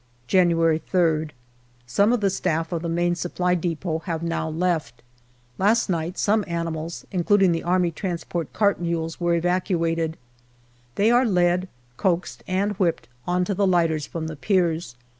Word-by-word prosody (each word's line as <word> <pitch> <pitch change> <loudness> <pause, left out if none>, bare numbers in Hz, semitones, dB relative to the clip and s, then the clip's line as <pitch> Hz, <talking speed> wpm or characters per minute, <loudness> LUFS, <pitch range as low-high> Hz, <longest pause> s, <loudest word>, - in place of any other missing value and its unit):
January 165 -1 +3
3rd. 160 -4 +2 0.6
Some 200 - +2
of 245 -3 +1
the 195 -1 +2
staff 165 -3 -1
of 170 -2 -2
the 170 - -3
Main 175 +1 +1
Supply 180 +1 -1
depot 165 -1 -2
have 165 -3 -3
now 165 -1 -2
left. 160 -7 -2 0.6
Last 215 +1 +3
night 170 +2 -2
some 210 +1 +2
animals, 165 -1 -4
including 190 0 +3
the 165 - 0
A.T. 175 -2 -1
cart 200 -4 +1
mules, 165 -1 -3
were 175 0 +2
evacuated. 165 -2 0 0.8
They 215 +3 +3
are 245 +2 +5
led, 180 -4 +2 0.3
coaxed, 180 -1 -1
and 195 +3 0
whipped 170 -10 0 0.2
on 180 0 +1
to 200 - -1
the 195 +1 +1
lighters 165 -5 +1
from 165 -1 -5
the 160 0 -5
piers. 170 - 0
175 Hz, 150 wpm, -24 LUFS, 165-185 Hz, 0.8 s, are